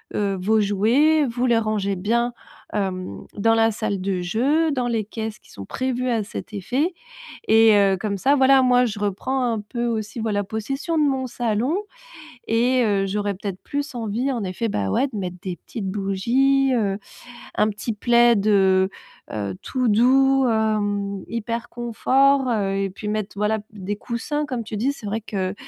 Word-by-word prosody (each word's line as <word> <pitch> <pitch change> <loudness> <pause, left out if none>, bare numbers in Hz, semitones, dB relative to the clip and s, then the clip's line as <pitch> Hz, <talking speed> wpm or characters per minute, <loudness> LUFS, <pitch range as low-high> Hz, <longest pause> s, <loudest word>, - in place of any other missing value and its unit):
heu, 200 -2 0
vos 215 +4 +2
jouets, 245 +10 +3
vous 245 +2 -1
les 235 -2 +4
rangez 215 -3 0
bien, 235 +6 0 0.4
hem, 185 - -3
dans 225 +2 +3
la 225 0 +3
salle 200 -2 -2
de 185 -1 -1
jeux, 275 - +1
dans 250 -3 -1
les 225 -3 -1
caisses 220 0 -5
qui - - -24
sont 100 - -9
prévues 255 - -2
à 225 -3 +1
cet 215 +1 -8
effet» 260 - -1 0.5
et 225 0 +6
heu, 195 -2 +4
comme 200 -1 -2
ça, 275 +9 +3
voilà, 270 -1 +5
moi 250 0 +4
je 210 -3 -4
reprends 210 +7 -1
un 230 -3 0
peu 235 +3 -4
aussi, 220 0 -3
voilà, 210 -2 0
possession 270 - -3
de - - +4
mon 265 -2 +1
salon 240 +5 -1 0.7
et 245 +3 +3
heu, 200 -2 +1
j'aurais 205 0 -1
peut-être 195 -1 -6
plus 285 0 -4
envie, 235 +3 -1
en 240 -4 -3
effet, 185 +5 -3
bah, 100 - -1
ouais, 275 - +2
de - - -6
mettre 180 -2 -4
des 185 -3 -4
petites 215 -5 -7
bougies, 235 +8 +2
heu, 200 -4 0 0.6
un 215 - +2
petit 215 +3 -4
plaid, 235 -1 +4
heu 190 -2 +4 0.4
heu, 100 -3 -3
tout 255 -1 -1
doux, 265 +4 +4
hem, 205 -3 0
hyper 230 +1 -3
confort, 265 +3 +2
heu 205 -4 0
et 195 -1 -1
puis 210 +3 -9
mettre, 210 -1 -3
voilà, 210 +1 0
des 205 -1 -4
coussins. 275 +7 -3
Comme 250 -5 -4
tu 215 0 -6
dis, 250 +7 +1
c'est 230 - -10
vrai 215 +2 -2
que, 195 -3 -3
220 Hz, 180 wpm, -22 LUFS, 200-250 Hz, 0.7 s, et